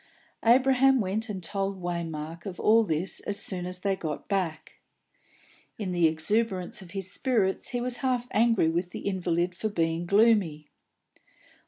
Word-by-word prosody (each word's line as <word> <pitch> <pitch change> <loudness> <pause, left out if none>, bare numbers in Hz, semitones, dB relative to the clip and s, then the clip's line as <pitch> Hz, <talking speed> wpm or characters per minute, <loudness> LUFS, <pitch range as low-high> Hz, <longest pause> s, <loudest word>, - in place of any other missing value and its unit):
Abraham 265 +2 +5
went 215 +3 -2
and 190 -3 -5
told 195 +2 -2
Waymark 170 -1 -5
of 185 - -7
all 225 +1 +5
this 165 -1 -1
as 205 0 -2
soon 180 -2 -1
as 180 0 -3
they 195 0 +1
got 155 -5 -5
back. 180 -6 -3 1.0
In 200 -4 -3
the 175 -2 +3
exuberance 185 +5 -1
of 185 - -12
his 190 0 -2
spirits 210 -6 +1
he 245 - -3
was 245 0 -1
half 250 -2 -1
angry 225 -5 +3
with 175 +2 -1
the - - -7
invalid 180 -2 -1
for 215 +5 -3
being 165 -2 -1
gloomy. 200 -8 +3
190 Hz, 155 wpm, -27 LUFS, 170-220 Hz, 1.0 s, Abraham